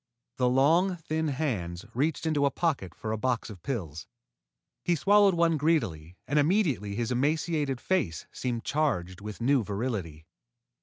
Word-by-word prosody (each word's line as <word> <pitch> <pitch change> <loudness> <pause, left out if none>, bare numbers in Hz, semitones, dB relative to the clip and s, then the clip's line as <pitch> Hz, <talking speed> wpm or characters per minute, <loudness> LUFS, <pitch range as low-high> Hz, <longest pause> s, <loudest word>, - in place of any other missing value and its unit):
The 125 -1 +3
long, 165 +9 +3
thin 160 -1 -2
hands 110 - -2
reached 150 +6 0
into 150 -3 +2
a - - +2
pocket 140 - -2
for 110 - -5
a 110 - -2
box 125 -2 -1
of 95 -5 -11
pills. 85 - -4 0.8
He 175 - +2
swallowed 200 +2 +5
one 165 -1 +3
greedily, 100 - 0
and 150 +2 +2
immediately 145 - +1
his 120 +2 -2
emaciated 145 +1 0
face 110 - -1
seemed 120 -3 -3
charged 95 - -1
with 105 +2 -7
new 130 0 +3
virility. 100 -8 -4
130 Hz, 150 wpm, -28 LUFS, 105-160 Hz, 0.8 s, swallowed